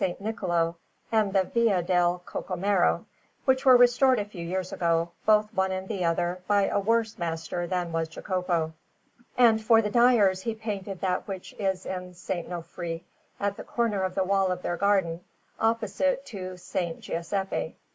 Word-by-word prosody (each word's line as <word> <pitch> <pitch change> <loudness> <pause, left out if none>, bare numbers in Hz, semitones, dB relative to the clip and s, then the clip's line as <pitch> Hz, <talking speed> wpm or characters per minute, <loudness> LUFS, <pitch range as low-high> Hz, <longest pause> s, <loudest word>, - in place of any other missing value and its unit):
Niccolò 175 -3 -1 0.3
and 215 -3 +2
the 190 -1 +3
Via 210 -3 +1
del 175 0 +1
Cocomero, 195 -1 0 0.4
which 260 0 +3
were 255 -2 +8
restored 245 +1 +5
a 205 - -1
few 195 -5 -8
years 185 +2 -3
ago, 170 0 +1 0.2
both 215 0 +4
one 190 -2 +1
and 190 0 -4
the 195 -4 -2
other, 175 +2 0
by 205 -1 +3
a - - +1
worse 225 +1 0
master 170 +1 -3
than 180 -1 -2
was 165 0 -1
Jacopo; 170 -1 -2 0.6
and 225 -3 +5
for 225 0 +6
the 210 - -2
Dyers 225 -6 +4
he 225 +2 -3
painted 200 -3 -5
that 185 -1 -1
which 190 -2 -7
is 190 -2 -1
in 180 -1 -5
S. 180 0 -17
Nofri, 170 -1 -4 0.4
at 200 0 -1
the - - -7
corner 230 -5 -1
of 185 -1 -2
the 190 - +2
wall 195 0 +2
of 180 0 -4
their 175 - -1
garden, 185 -3 +1 0.4
opposite 230 +5 0
to 190 -8 -6
S. 180 - -14 0.2
Giuseppe. 190 +3 -3
190 Hz, 165 wpm, -27 LUFS, 175-215 Hz, 0.6 s, were